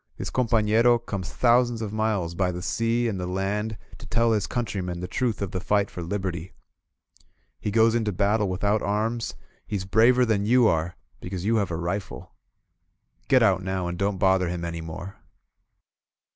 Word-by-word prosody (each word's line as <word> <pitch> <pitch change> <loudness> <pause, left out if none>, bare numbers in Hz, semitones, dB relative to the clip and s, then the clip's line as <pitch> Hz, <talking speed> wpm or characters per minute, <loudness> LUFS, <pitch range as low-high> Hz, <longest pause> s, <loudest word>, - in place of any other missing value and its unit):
This - - -5
companero 115 0 +3
comes 100 -5 -6
thou 125 0 +5
sands 120 -2 -4
of 110 -2 -4
miles 110 -6 -1
by 90 +1 0
the 90 0 -6
sea 115 +3 0
and 100 -4 -2
the 90 - -3
land 100 +4 -2 0.2
to - - -11
tell 115 -1 +2
his 105 -2 +1
coun 120 -1 -1
trymen 90 -4 -4
the 90 - -4
truth 115 +1 -1
of 95 - -4
the 95 - -2
fight 100 +2 +1
for 90 - -6
Liberty. 90 -1 -4 1.1
He - - -3
goes 110 +2 +4
into 110 -3 0
battle 100 +2 +1
without 100 +3 0
arms, 110 +3 -1 0.3
he's 100 -3 -3
braver 120 +5 +4
than 110 -3 +1
you 120 +3 +4
are, 80 -1 0 0.2
be - - -8
cause 95 -1 -4
you 115 +2 +2
have 100 -2 0
a 85 - -3
rifle. 90 +4 -5 0.9
Get 130 -3 +5
out 95 -4 +3
now, 95 -1 -2
and 85 - -3
don't 100 +2 -1
bother 95 -1 +2
him 85 -1 -3
any 85 -1 -4
more!" 80 +4 -8
100 Hz, 185 wpm, -25 LUFS, 90-115 Hz, 1.1 s, thou